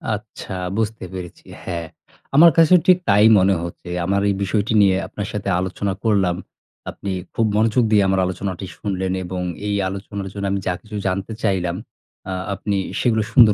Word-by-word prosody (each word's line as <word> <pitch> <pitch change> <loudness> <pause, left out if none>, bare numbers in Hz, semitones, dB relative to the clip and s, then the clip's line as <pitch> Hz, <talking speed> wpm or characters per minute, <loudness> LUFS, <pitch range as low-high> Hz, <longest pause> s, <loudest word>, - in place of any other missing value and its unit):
আচ্ছা 105 -1 -9 0.2
বুঝতে 110 -2 -2
পেরেছি। 90 -2 -8 0.2
হ্যাঁ, 85 -2 -4 0.5
আমার 165 +3 +8
কাছেও 165 +2 +7
ঠিক 185 -1 +7
তাই 105 +2 +6
মনে 95 +1 +3
হচ্ছে। 85 +1 -8 0.2
আমার 100 +2 +1
এই 100 - +1
বিষয়টি 105 +3 0
নিয়ে 95 -2 +5
আপনার 100 -1 -5
সাথে 100 -1 -3
আলোচনা 95 +1 -2
করলাম। 100 -6 +2 0.6
আপনি 100 - -5 0.2
খুব 115 - +2
মনোযোগ 110 +3 +3
দিয়ে 105 -2 +5
আমার 95 0 +2
আলোচনাটি 95 0 -4
শুনলেন 95 -2 -2
এবং 90 +1 -4 0.3
এই 100 - 0
আলোচনার 100 0 -6
জন্য 100 -1 -4
আমি 100 - 0
যা 90 - +2
কিছু 110 -1 -10
জানতে 95 +4 -2
চাইলাম, 90 -3 0 0.5
আ - - -2 0.2
আপনি 100 0 -2 0.2
সেগুলো 110 -3 +2
সুন্দর 115 -5 +7
100 Hz, 170 wpm, -21 LUFS, 95-110 Hz, 0.6 s, আমার